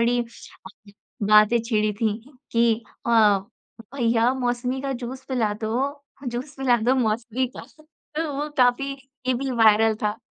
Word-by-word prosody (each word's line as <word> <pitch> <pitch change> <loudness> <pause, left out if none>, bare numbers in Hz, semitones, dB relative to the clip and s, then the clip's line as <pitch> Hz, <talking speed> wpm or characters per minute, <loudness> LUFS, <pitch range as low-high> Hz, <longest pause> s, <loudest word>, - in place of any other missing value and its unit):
बड़ी 240 +1 +2 1.0
बातें 215 +3 +5
छिड़ी 215 -2 0
थीं 215 -2 +1 0.3
कि 230 -1 +4 0.3
अ, - - +1 0.8
"भैया, 235 -2 +2
मौसमी 250 +1 -2
का 275 0 -2
जूस 260 +2 -7
पिला 230 -5 0
दो, 270 +6 -2 0.3
जूस 255 +5 -5
पिला 255 -3 +3
दो 245 +4 +2
मौसमी 235 +1 0
का।" - - -7 0.5
तो 315 -1 -1
वो 295 +2 -2
काफ़ी, 255 +2 +3 0.3
ये 255 - +2
भी 270 +2 -2
वायरल 225 -1 +5
था। 210 +1 0
240 Hz, 140 wpm, -24 LUFS, 225-260 Hz, 1.0 s, बातें